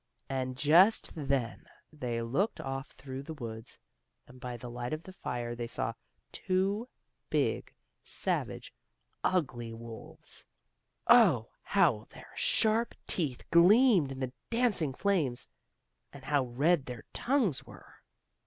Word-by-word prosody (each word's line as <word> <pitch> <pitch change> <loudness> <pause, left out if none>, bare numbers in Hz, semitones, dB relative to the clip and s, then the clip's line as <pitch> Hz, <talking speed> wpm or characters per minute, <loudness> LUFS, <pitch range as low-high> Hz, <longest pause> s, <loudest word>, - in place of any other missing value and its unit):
And 130 -1 -2
just 170 - +5
then 135 -6 -1 0.3
they 120 -5 -3
looked 140 - 0
off 135 +1 -4
through 135 -1 -7
the 160 +3 -7
woods, 115 -3 -7 0.5
and 125 +1 -15
by 125 -1 -5
the 120 - -8
light 120 +2 -4
of 155 +1 -4
the 185 - -11
fire 120 -8 -4
they 120 0 -4
saw - - -2 0.4
two 195 +6 0 0.4
big, - - 0 0.3
savage, - - -2 0.5
ugly 125 -10 0
wolves. 115 0 -7 0.6
Oh, 180 - +6
how 160 - +2
their - - -13
sharp 225 +2 +2
teeth 145 -9 -2
gleamed 185 - +6
in 135 0 -6
the 130 -1 -3 0.2
dancing 225 - +1
flames, 155 -12 +1 0.6
and 140 -2 -12
how 140 -1 +1
red 140 +5 +2
their 125 -3 -7
tongues 245 - +1
were! - - -15
140 Hz, 125 wpm, -31 LUFS, 125-185 Hz, 0.6 s, Oh